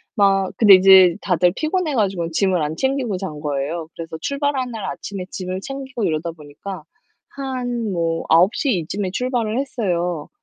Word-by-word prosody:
막 195 -2 +3
근데 205 -4 +8
이제 185 -2 +7
다들 180 -1 +2
피곤해 315 -1 -1
가지고는 190 -7 0
짐을 185 0 +1
안 150 +1 -2
챙기고 265 -7 -1
잔 180 -6 -6
거예요. 150 +3 -3
그래서 165 -1 -6
출발하는 280 -3 -1
날 220 -3 -5
아침에 195 -2 -6
짐을 185 0 -4
챙기고 270 -2 -6
이러다 160 +1 -1
보니까 160 +3 -9 0.5
한 245 -5 -3
뭐 165 -2 -1
9:00 190 - +3
이쯤에 185 +3 -3
출발을 245 0 -1
했어요. 180 - -2
190 Hz, 330 characters per minute, -21 LUFS, 170-245 Hz, 0.5 s, 근데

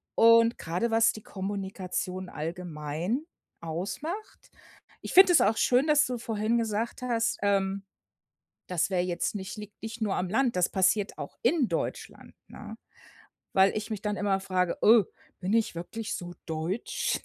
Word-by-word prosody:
Und 230 +1 +6
grade, 180 +8 -2
was 225 -1 +4
die 215 - -9
Kommunikation 190 -1 -4
allgemein 165 - -4 0.4
ausmacht. 195 - -5 0.5
Ich - - -6
finde 370 -1 +8
es - - +6
auch 220 +2 +3
schön, 255 +3 +3
dass 300 0 +5
du 250 -3 -3
vorhin 225 0 -1
gesagt 225 +1 -2
hast, 230 -2 0
ähm, 195 -1 +1 0.8
das 180 -1 0
wäre 185 -2 +1
jetzt 175 +3 -2
nicht 190 +1 -6
liegt 210 -1 -10
nicht 225 +1 -6
nur 205 -3 0
am 180 0 -2
Land. 245 +1 +1
Das 180 -1 +2
passiert 195 +2 +1
auch - - -8
in 270 0 +3
Deutschland, - - -4
ne? - - -10 0.8
Weil 190 +1 +4
ich 215 +1 -4
mich 210 - -3
dann 210 -1 -2
immer 195 -1 +1
frage: 185 -2 -1
„Äh, 220 -1 +7 0.4
bin 190 +4 -1
ich 225 -6 +1
wirklich 215 +6 -5
so 175 -2 -7
deutsch, 160 +7 -2
205 Hz, 155 wpm, -28 LUFS, 185-230 Hz, 0.8 s, finde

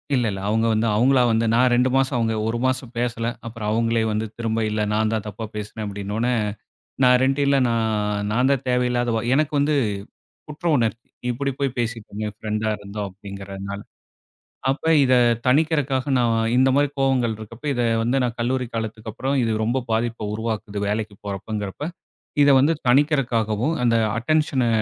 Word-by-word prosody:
இல்ல, 125 -2 +1
இல்ல. 95 -1 -5
அவுங்க 110 +2 +1
வந்து 110 +1 +1
அவுங்களா 130 +4 +4
வந்து, 115 +1 +2
நான் 125 +2 +4
2 125 +1 +3
மாசம், 135 0 +2
அவுங்க 115 -1 0
1 115 +1 -1
மாசம் 130 -2 -1
பேசல. 115 -1 -1 0.2
அப்புறம் 115 -2 -5
அவுங்களே 115 0 +1
வந்து, 110 +1 -1
திரும்ப 115 -1 -1
இல்ல 105 0 -1
நான் 110 0 +1
தான் 110 -2 -2
தப்பா 105 +2 -6
பேசுனேன், 105 +1 -5
அப்படின்னோன, 100 +3 -3 0.8
நான் 125 0 +6
2 135 +2 +1
இல்ல. 140 0 +3
நான், 105 -3 0
நான் 125 +4 +2
தான் 135 -1 0
தேவையில்லாத 125 -1 +1
வ - - +1 0.2
எனக்கு 150 +1 +1
வந்து 145 +2 +2 0.8
குற்ற 150 +3 -7
உணர்ச்சி. 115 -1 -1 0.2
இப்படி 140 +3 -1
போய் 135 -3 -1
பேசிட்டமே, 110 -2 -3
பிரெண்டா 110 0 -1
இருந்தும் 100 0 -5
அப்படிங்கிறதுனால. 100 0 -7 0.9
அப்ப 135 - -3 0.2
இத 130 -1 +4 0.3
தனிக்கிறக்காக, 140 -1 +2
நான் 115 -2 +2 0.2
இந்த 130 +1 +5
மாதிரி 145 0 +3
கோபங்கள் 130 -4 +2
இருக்கப்போ, 110 +6 -10
இத 120 - 0 0.2
வந்து 120 +4 +1
நான் 120 -1 -2
கல்லூரி 125 +2 0
காலத்துக்கு 110 -1 -4
அப்பறம், 135 +4 -1
இது 115 -1 +1
ரொம்ப 125 +4 0
பாதிப்ப 115 -1 -1
உருவாக்குது 110 -2 -3
வேலைக்கு 105 0 -2
போறப்பங்கிறப்ப, 100 +3 -5 0.6
இத 140 - +5
வந்து 145 +5 +4 0.2
தனிக்கிறக்காகவும், 125 -2 +2
அந்த 115 -1 +3 0.2
அட்டென்ஷனை 135 -1 +1
115 Hz, 160 wpm, -23 LUFS, 110-130 Hz, 0.9 s, நான்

